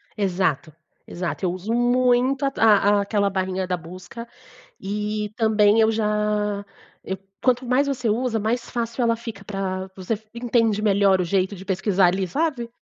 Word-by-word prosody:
Exato, 180 -6 -1 0.3
exato. 180 +2 -4
Eu 175 - +1
uso 190 +5 -4
muito 250 +2 +2
a - - +3
a 205 -2 +4
aquela 200 0 0
barrinha 190 -1 -2
da 180 - 0
busca 185 +8 -10 0.5
e 210 +1 -3
também 220 -1 +4
eu 220 0 +4
já 210 -1 0 0.4
eu 190 0 -4 0.2
quanto 255 0 +2
mais 255 +3 +2
você 250 -4 -1
usa, 235 0 0
mais 230 +3 -1
fácil 235 +1 -2
ela 230 -1 +2
fica 225 -4 -8
pra 190 -1 -4
você 190 +4 -3
f 220 +1 -11
entende 230 -3 +1
melhor 200 -2 +3
o - - +1
jeito 190 +2 0
de 190 - -10
pesquisar 190 -1 +2
ali, 190 +1 0
sabe? 270 - -2
210 Hz, 165 wpm, -23 LUFS, 190-235 Hz, 0.5 s, a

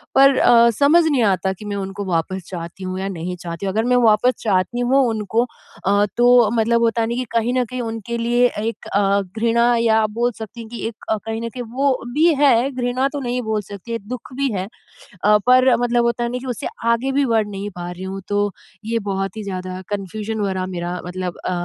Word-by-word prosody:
पर 275 0 +6
अ, 235 -2 +6
समझ 305 +5 +5
नहीं 285 -6 +2
आता 190 -2 +1
कि 200 +3 -12
मैं 205 -1 -3
उनको 195 +1 -5
वापस 185 +1 -2
चाहती 175 +1 -7
हूँ 185 0 -4
या 190 - -2
नहीं 180 -1 -4
चाहती 170 +2 -6
हूँ, 190 - -1
अगर 220 +2 +1
मैं 250 0 +3
वापस 225 +3 +4
चाहती 205 +3 +1
हूँ 255 +3 +3
उनको 220 +2 0 0.4
अ, 200 +1 +3
तो 240 -2 +5
मतलब 235 +1 +2
होता 230 0 +2
है 225 - 0
ना 235 - -2
कि 255 +1 -2
कहीं 230 +1 +1
न 250 - +1
कहीं 250 +2 -5
उनके 225 0 -4
लिए 240 +1 +2
एक 225 +2 -4
अ, 200 0 +3 0.2
घृणा 235 +1 +3
या 225 -1 +3
आप 215 - 0
बोल 245 +1 +2
सकती 220 +1 -8
हैं 225 - -10
कि 235 - -6
एक 225 -1 -10
अ, 220 - +2
कहीं 225 0 -3
न 230 - -3
कहीं 245 +1 -6
वो 275 +2 +2 0.2
भी 325 +4 +4
है 265 -1 +4
घृणा 255 +1 0
तो 290 - -2
नहीं 250 0 -2
बोल 220 -2 -1
सकती, 230 +4 -5
दुःख 250 +1 -7
भी 275 -2 0
है। 185 +1 -3 0.6
अ, 210 0 +6
पर 255 0 +6
मतलब 240 0 +2
होता 235 0 0
है 235 - -2
ना 250 - -2
कि 255 - -9
उससे - - -6 0.3
आगे 260 +4 -2
भी 280 0 +2
बढ़ 220 -1 +2
नहीं 205 0 -5
पा 175 - -5
रही 180 +1 -8
हूँ 195 +1 -5
तो, 205 0 0 0.3
ये 230 +1 0
बहुत 195 +1 -3
ही 215 - -4
ज़्यादा 185 -1 -5
कन्फ्यूजन 210 +2 -4
भरा 190 -2 -1
मेरा 175 -1 -4
मतलब 180 0 -4
अ, - - 0
225 Hz, 230 wpm, -20 LUFS, 195-245 Hz, 0.6 s, पर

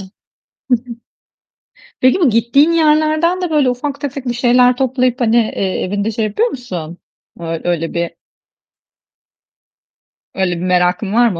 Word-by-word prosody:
Hı - - -8
hı. - - -14 1.9
Peki 255 +8 +3
bu 305 -8 +4
gittiğin 235 +8 +3
yerlerden 310 +2 +2
de 300 -7 +1
ufak 275 +3 -4
tefek 275 -2 -5
bir 240 - -1
şeyler 245 +1 +3
toplayıp 255 -1 0
hani, 230 -1 +2
eee, 205 -4 0
evinde 205 +3 -2
şey 220 0 -2
yapıyor 215 - 0
musun? 180 - -7 0.4
Ö 165 -1 -4
öyle 165 -2 -2
bir 170 0 -1 2.3
öyle 185 -2 0
bir - - -6
merakın 180 +2 +1
var 240 +1 +4
mı? 180 -6 -5
240 Hz, 135 wpm, -16 LUFS, 190-275 Hz, 2.3 s, bu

